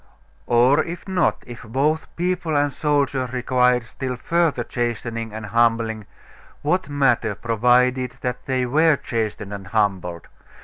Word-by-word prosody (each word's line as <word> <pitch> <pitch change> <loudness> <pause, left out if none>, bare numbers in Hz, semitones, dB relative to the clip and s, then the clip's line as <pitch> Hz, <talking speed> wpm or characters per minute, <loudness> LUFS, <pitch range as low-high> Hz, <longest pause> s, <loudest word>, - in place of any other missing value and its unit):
Or 125 +6 +4
if 175 +3 -7
not 190 -2 +1
if 120 -1 -9
both 140 +8 0
people 175 -3 -1
and 145 -1 +1
soldiers 140 -4 0
required 125 -1 +2
still 130 +2 -5
further 165 -1 0
chastening 115 -1 -3
and 110 0 -6
humbling 115 -1 +1 0.6
what 175 +1 0
matter, 135 -7 +1
provided 125 +3 +2
that 125 0 -4
they 130 -1 0
were 155 +5 +4
chastened 110 -5 -4
and 100 -1 -7
humbled? 95 -5 -1
125 Hz, 130 wpm, -22 LUFS, 115-145 Hz, 0.6 s, Or